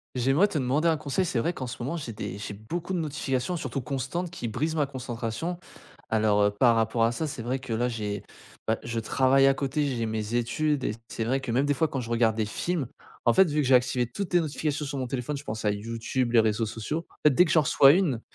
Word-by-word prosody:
J'aimerais 135 +11 +3
te 190 - -3
demander 140 +5 +1
un 165 - +4
conseil. 155 +5 -1
C'est 135 -8 0
vrai 165 +9 +1
qu'en 130 -7 -6
ce 120 - -5
moment 155 +7 -2
j'ai 120 -7 -6
des 100 -2 -5
j'ai 105 0 -6
beaucoup 160 - -5
de 180 - 0
notifications 150 0 -2
surtout 140 -3 -3
constantes 140 +7 -3
qui 170 -8 -5
brisent 150 +9 -2
ma 150 -2 +2
concentration. 125 +4 -4 0.5
Alors, 105 -2 +3
heu, 105 - +3
par 115 +3 +4
rapport 115 +1 +1
à 115 - +3
ça, 155 +7 -2
c'est 140 -4 -5
vrai 125 +3 -2
que 130 -3 -5
là 120 +2 +1
j'ai 105 -3 -4 0.4
ben 110 0 +2
je 115 -1 -3
travaille 135 +4 +3
à 135 - +5
côté, 145 +2 -1
j'ai 120 -4 -1
mes 110 +1 -3
études 135 +4 0
et - - 0 0.2
c'est 115 - -3
vrai 130 +4 +1
que, 135 - -4
même, 130 +4 +2
des 145 - +3
fois, 160 - +2
quand 135 - -3
je 120 -2 -6
regarde 115 -2 +2
des 110 - 0
films, 165 +5 -2 0.4
en 120 - +5
fait, 190 -1 +6
vu 150 0 +1
que 135 - 0
j'ai 130 - +4
activé 125 0 +2
toutes 195 - -5
les - - +7
notifications 150 -1 -2
sur 140 0 -4
mon 130 - -1
téléphone, 130 +3 -3
je 140 - -9
pense 110 -5 -5
à 105 - +3
YouTube, 115 +4 -2
les 115 - +7
réseaux 110 +1 +1
sociaux. 135 +10 -4
En - - -23
fait, 150 - +6
dès 180 - +6
que 160 - -2
j'en 160 -2 +5
reçois 135 -1 +6
une, 160 -10 +1
130 Hz, 260 wpm, -27 LUFS, 115-150 Hz, 0.5 s, les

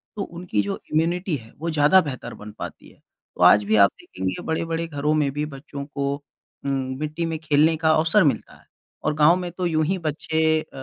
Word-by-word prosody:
तो 210 - -4
उनकी 170 - -2
जो 100 0 -3
इम्यूनिटी 170 +2 +1
है, 115 -3 -10
वो 165 +3 -3
ज़्यादा 155 +5 +5
बेहतर 130 -6 -6
बन 105 - -8
पाती - - -8
है। - - -22 0.4
तो - - -7
आज 105 - +7
भी 105 +2 +1
आप 100 -2 +6
देखेंगे, 95 0 -4
बड़े-बड़े 165 +1 -2
घरों 150 0 -1
में 150 -3 +1
भी 150 +2 -2
बच्चों 140 0 -8
को 140 -1 -2 0.5
उम, 140 - 0 0.3
मिट्टी 155 +2 -3
में 165 -1 -2
खेलने 155 +1 +3
का 160 0 +3
अवसर 165 +5 +4
मिलता 135 -7 0
है, - - -25 0.4
और - - +1
गाँव 155 +3 +6
में 180 -1 -4
तो 180 +1 -3
यूँ 155 -2 +1
ही 190 +3 0
बच्चे 160 0 0
अ, - - -15
155 Hz, 210 wpm, -23 LUFS, 140-165 Hz, 0.5 s, आज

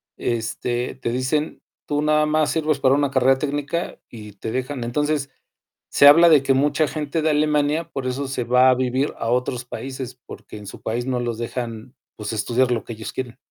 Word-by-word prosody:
este, 120 +2 -2
te 125 -2 -4
dicen: 130 +5 -1 0.2
"Tú 145 0 -1
nada 150 0 +3
más 155 0 +2
sirves 155 -3 0
para 135 0 +4
una 145 -1 +1
carrera 130 0 +4
técnica" 145 +4 -3
y 105 -3 -10
te 110 +3 -6
dejan. 130 0 -3
Entonces, 145 +2 -1 0.6
se 145 - +7
habla 165 +4 +8
de 150 -4 +6
que 135 - +3
mucha 145 +3 +2
gente 155 +1 -3
de 155 0 +2
Alemania 150 +1 +1
por 130 -2 -4
eso 135 +2 -2
se 125 -2 -2
va 125 +2 +5
a - - +3
vivir 130 +2 0
a 115 - -3
otros 125 0 -1
países, 130 -1 -7
porque - - -10
en 105 - -11
su - - -10
país 120 +2 -2
no 125 -1 0
los 120 -2 -3
dejan, 120 0 -5 0.2
pues, 105 +1 -5
estudiar 120 +4 +1
lo 115 - 0
que 115 - -6
ellos 110 0 -7
quieren. 125 -2 -5
130 Hz, 200 wpm, -22 LUFS, 120-145 Hz, 0.6 s, habla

